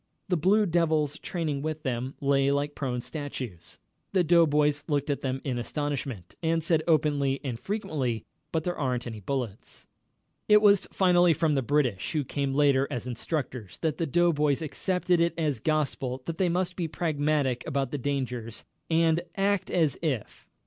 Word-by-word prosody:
The 180 - +3
Blue 200 +6 +3
Devils 160 -4 +1
training 155 -6 -2
with 155 +1 -4
them 130 -1 -3
lay 140 -1 +2
like 145 +1 0
prone 125 -4 -3
statues. 125 - -6 0.4
The 185 -2 +4
doughboys 150 -3 +3
looked 145 -1 0
at 140 - -2
them 130 0 -2
in 125 -3 -2
astonishment, 135 - -4
and 165 -1 +1
said, 160 -1 +2
openly 145 -4 +2
and 125 -5 -4
frequently: 140 - -2 0.3
"But 160 -1 0
there 175 0 -3
ain't 125 -4 -1
any 115 -3 -6
bullets." 120 -1 -5 0.6
It 210 0 +8
was 205 -2 +4
finally 175 -2 +4
from 155 +1 +1
the 135 - +2
British, 130 -7 0
who 150 -2 +1
came 140 0 -2
later 140 -2 +4
as 120 - -4
instructors, 125 - -4
that 155 -2 0
the 165 - 0
doughboys 150 -2 +2
accepted 180 +2 0
it 170 0 +1
as 150 -7 0
gospel 135 -3 -1
that 165 -1 -5
they 185 -2 +3
must 180 +1 -1
be 170 -3 -2
pragmatic 150 -5 0
about 135 -2 -1
the 145 - -3
dangers, 125 -4 -3 0.2
and 165 0 +3
"act 195 -1 +1
as 160 -6 +1
if...." 135 -10 -3
145 Hz, 165 wpm, -28 LUFS, 130-165 Hz, 0.6 s, It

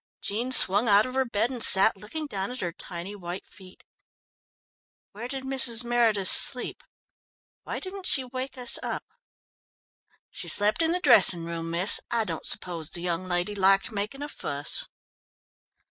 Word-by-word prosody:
Jean 235 +5 -4
swung 205 -2 +4
out 205 0 +4
of 255 - -7
her 265 0 0
bed 235 +1 -1
and 250 -3 -5
sat 195 +2 +5
looking 220 +11 -8
down 195 -8 -4
at 250 +1 -8
her 175 - -3
tiny 175 +4 -8
white 180 -1 -8
feet. 185 -1 -17 1.3
"Where 225 +4 -8
did 265 +1 -7
Mrs. 260 -3 0
Meredith 230 -5 0
sleep? 250 +5 +2 0.8
Why - - -5
didn't 380 -1 -7
she 270 - +2
wake 255 +1 -7
us 245 -1 +2
up?" - - -5 1.3
"She - - -7
slept 210 +9 +4
in 325 0 +1
the 360 - -1
dressing 235 - +6
room, 165 0 -6
miss. 175 +4 +3
I 235 -1 -1
don't 165 -6 -4
suppose 170 -4 -1
the 170 - -2
young 175 +1 -3
lady 175 +3 -2
liked 195 +4 +3
making 215 +7 -5
a - - -5
fuss." 145 - -2
210 Hz, 160 wpm, -25 LUFS, 185-255 Hz, 1.3 s, dressing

